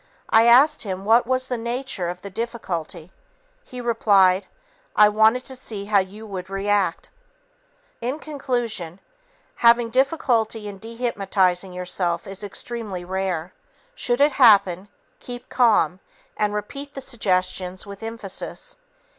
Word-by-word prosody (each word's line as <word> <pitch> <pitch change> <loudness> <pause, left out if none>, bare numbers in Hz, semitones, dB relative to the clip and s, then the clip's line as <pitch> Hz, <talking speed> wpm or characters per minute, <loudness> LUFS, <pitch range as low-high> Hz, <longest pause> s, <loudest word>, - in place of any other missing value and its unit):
I 225 +1 +6
asked 260 +6 +6
him 190 -2 -5
what 230 +2 +4
was 255 0 +1
the 245 -2 -2
nature 235 -6 -3
of 180 +1 -7
the 200 - -8
difficulty. 185 -7 -5 0.5
He 250 - -10
replied, 200 -5 +3 0.5
"I 210 0 +7
wanted 220 +4 +3
to 260 - -5
see 210 -5 -5
how 205 -1 +3
you 200 +4 -6
would 190 -3 -7
react." 195 -2 -1 0.9
In 250 +5 -2
conclusion, 240 - -3 0.6
having 235 0 +4
difficulty 235 -5 +1
in 200 -1 -8
dehypnotizing 195 -5 -1
yourself 180 -1 -2
is 195 +1 -6
extremely 205 -3 -5
rare. 185 -2 -3 0.4
Should 245 - 0
it 290 +1 +5
happen, 200 -8 +5 0.3
keep 245 -1 -9
calm, 210 -8 +3 0.4
and 210 -1 0
repeat 275 +8 -6
the 270 - -5
suggestions 185 -6 -1
with 200 0 -10
emphasis. 225 - -6
210 Hz, 130 wpm, -23 LUFS, 190-240 Hz, 0.9 s, I